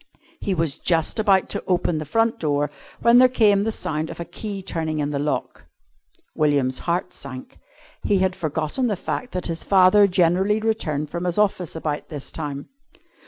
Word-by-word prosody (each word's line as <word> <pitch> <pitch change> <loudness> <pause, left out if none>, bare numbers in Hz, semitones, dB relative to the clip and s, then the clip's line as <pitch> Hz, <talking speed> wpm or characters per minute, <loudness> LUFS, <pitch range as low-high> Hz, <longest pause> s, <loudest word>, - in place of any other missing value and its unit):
He 195 - -1
was 160 -4 -1
just 165 +5 0
about 195 -3 +3
to - - -3
open 175 -3 +1
the 155 - -5
front 225 +4 +1
door 145 -2 0 0.3
when 235 +1 +6
there 255 - +8
came 210 -5 +4
the 225 - 0
sound 155 -6 -2
of - - -8
a 170 - -4
key 200 -1 -6
turning 160 -3 -2
in 145 -1 -1
the 140 - -2
lock. 145 +1 -3 0.7
William's 140 -4 +1
heart 180 +1 -1
sank. 130 -2 -9 0.4
He 205 - +2
had 190 0 +1
forgotten 160 - -2
the 210 - 0
fact 250 +7 -4
that 180 -1 -3
his 165 -1 -3
father 195 +1 +5
generally 185 +3 +2
returned 155 -10 -2
from 175 +1 -3
his 175 +1 -1
office 195 -6 0
about 155 -2 -4
this 145 -3 -6
time. 145 -3 -6
175 Hz, 180 wpm, -23 LUFS, 150-200 Hz, 0.7 s, there